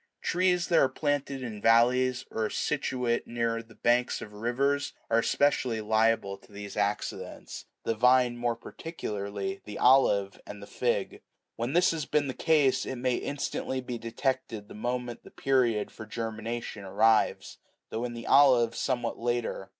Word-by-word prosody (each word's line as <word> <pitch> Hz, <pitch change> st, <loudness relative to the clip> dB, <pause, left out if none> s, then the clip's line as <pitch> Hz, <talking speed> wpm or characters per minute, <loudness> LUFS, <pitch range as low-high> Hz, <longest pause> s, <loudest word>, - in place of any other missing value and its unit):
Trees 180 Hz, 0 st, +2 dB
that 170 Hz, -, +5 dB
are 135 Hz, -, +4 dB
planted 140 Hz, -1 st, -2 dB
in 110 Hz, -4 st, -6 dB
valleys, 125 Hz, +3 st, +3 dB
and -, -, -5 dB
are 110 Hz, -1 st, +1 dB
situate 125 Hz, -5 st, -1 dB
near 115 Hz, -1 st, -1 dB
the 115 Hz, -1 st, -18 dB
banks 120 Hz, +1 st, +1 dB
of 105 Hz, -, -9 dB
rivers, 135 Hz, +6 st, 0 dB, 0.2 s
are 115 Hz, -, +5 dB
especially 130 Hz, -2 st, +1 dB
liable 110 Hz, -2 st, +1 dB
to -, -, -21 dB
these 100 Hz, 0 st, -8 dB
accidents, -, -, -3 dB, 0.2 s
the 115 Hz, -, 0 dB
vine 125 Hz, +1 st, +4 dB
more 120 Hz, -1 st, -1 dB
particularly, 100 Hz, -, -5 dB
the 105 Hz, -, -7 dB
olive, 105 Hz, -7 st, +4 dB
and 105 Hz, -, -8 dB
the 100 Hz, -, -9 dB
fig. -, -, -2 dB, 0.3 s
"When 120 Hz, +4 st, -3 dB
this 175 Hz, +2 st, +4 dB
has 160 Hz, -3 st, -3 dB
been 150 Hz, -1 st, +1 dB
the 130 Hz, -, -3 dB
case, 150 Hz, -4 st, +2 dB
it 130 Hz, -, -4 dB
may 125 Hz, 0 st, 0 dB
instantly 135 Hz, -2 st, -3 dB
be 125 Hz, -2 st, -5 dB
detected 115 Hz, -2 st, -3 dB
the -, -, -11 dB
moment 120 Hz, +2 st, -4 dB
the -, -, -13 dB
period 125 Hz, -6 st, +1 dB
for 110 Hz, -, -10 dB
germination 115 Hz, -1 st, -5 dB
arrives, 110 Hz, +3 st, +2 dB, 0.3 s
though, 115 Hz, +2 st, -3 dB
in 120 Hz, -1 st, -3 dB
the 115 Hz, -, -7 dB
olive, 125 Hz, -5 st, +5 dB
somewhat 125 Hz, -3 st, -2 dB
later. 120 Hz, -5 st, -2 dB
120 Hz, 160 wpm, -28 LUFS, 110-130 Hz, 0.3 s, that